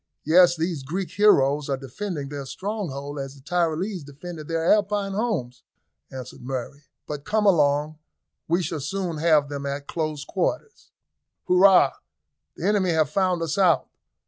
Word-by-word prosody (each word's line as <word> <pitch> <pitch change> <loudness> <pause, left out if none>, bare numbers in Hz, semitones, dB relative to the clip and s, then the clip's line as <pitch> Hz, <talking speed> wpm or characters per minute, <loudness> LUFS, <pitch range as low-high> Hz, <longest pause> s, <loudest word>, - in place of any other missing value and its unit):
"Yes; 175 +2 +5
these 165 -2 -2
Greek 175 +8 -4
heroes 150 -8 +3
are 135 - 0
defending 145 - -5
their 140 -2 -6
stronghold 145 -8 -5
as 135 0 -6
the 135 - -16
Tyrolese 175 +3 -1
defended 155 +2 -9
their 165 0 -1
Alpine 205 -1 0
homes," 195 - -2 0.5
answered 130 -2 -9
Murray; 135 +3 -6 0.2
"but 145 -2 -6
come 215 +4 0
along, 150 -4 +2 0.5
we 170 +3 +1
shall 160 -2 -3
soon 170 +3 -3
have 155 -2 +3
them 140 -1 -5
at 140 +1 -4
close 155 -2 -3
quarters." 305 - -3 0.6
"Hurrah! 185 +1 +6 0.6
the - - -5
enemy 200 -3 +2
have 155 -4 +2
found 185 -1 +1
us 165 +4 -2
out. 175 -7 +3
160 Hz, 145 wpm, -24 LUFS, 140-185 Hz, 0.6 s, Hurrah